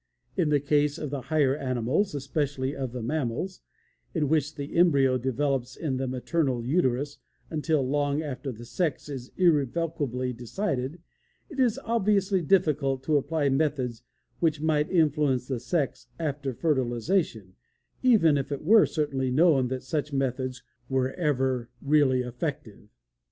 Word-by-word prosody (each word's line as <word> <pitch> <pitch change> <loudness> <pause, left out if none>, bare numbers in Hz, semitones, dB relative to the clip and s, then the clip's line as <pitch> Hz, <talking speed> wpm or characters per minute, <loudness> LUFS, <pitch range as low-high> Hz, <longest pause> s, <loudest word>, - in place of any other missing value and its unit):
In 170 -5 +1
the 145 -1 +3
case 145 +1 +1
of 150 -4 -5
the 140 -2 -3
higher 140 -1 +2
animals, 135 - 0
especially 140 -1 -2
of 130 -3 -3
the 125 -1 -5
mammals, 150 +7 -2 0.5
in 150 -4 +1
which 155 -1 +1
the 140 -1 -6
embryo 140 -7 +4
develops 130 0 -1
in 140 -6 -2
the 135 0 -2
maternal 130 -1 -1
uterus 140 -1 0 0.3
until 155 -3 0
long 145 +2 0
after 135 -2 -4
the 120 0 -10
sex 150 +3 -2
is 130 -3 -7
irrevocably 145 -5 +1
decided, 135 - -3 0.5
it 285 - -7
is 245 -4 +2
obviously 200 -4 +2
difficult 145 -6 +2
to 150 +1 +2
apply 145 0 0
methods 135 -4 0 0.4
which 155 -3 +1
might 150 -1 +1
influence 150 -7 +2
the 130 -3 -2
sex 140 +3 -2
after 145 -4 -2
fertilization, 125 - 0 0.5
even 165 - +5
if 135 +1 -4
it 140 - -3
were 215 +6 +6
certainly 135 -4 -1
known 140 -1 +4
that 130 0 -4
such 150 +2 -2
methods 130 -1 -2 0.3
were 130 -1 +1
ever 130 -7 0
really 140 -3 +3
effective. 125 -4 -5
140 Hz, 140 wpm, -27 LUFS, 130-155 Hz, 0.5 s, were